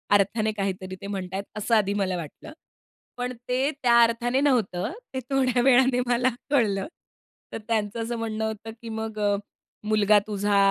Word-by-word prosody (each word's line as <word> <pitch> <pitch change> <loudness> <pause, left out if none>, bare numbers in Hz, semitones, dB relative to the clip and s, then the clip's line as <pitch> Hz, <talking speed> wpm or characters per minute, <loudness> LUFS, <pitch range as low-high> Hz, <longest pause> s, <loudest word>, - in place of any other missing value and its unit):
अर्थाने 215 +2 +2
काहीतरी 190 -1 -3
ते - - -6
म्हणत 190 -2 -4
आहेत 195 +1 -2
असं 215 +2 +1
आधी 200 -2 +2
मला 185 -2 0
वाटलं. 170 - -9 0.6
पण 250 0 -3 0.2
ते 260 +3 +1
त्या 235 -1 +6
अर्थाने 240 +3 +1
नव्हतं, 235 -11 +1 0.2
ते 260 - -2
थोड्या 255 -3 +2
वेळाने 260 -1 +5
मला 245 +1 +3 0.2
कळलं. 220 -8 +1 0.7
तर - - -2
त्यांचं 220 0 -1
असं 235 +1 -3
म्हणणं 220 -1 -2
होतं 220 0 -5
की 230 - -8
मग 220 -1 -5
"अ, 205 -1 +2 0.5
मुलगा 210 -1 +4
तुझा 205 -1 +1
220 Hz, 165 wpm, -25 LUFS, 200-245 Hz, 0.7 s, त्या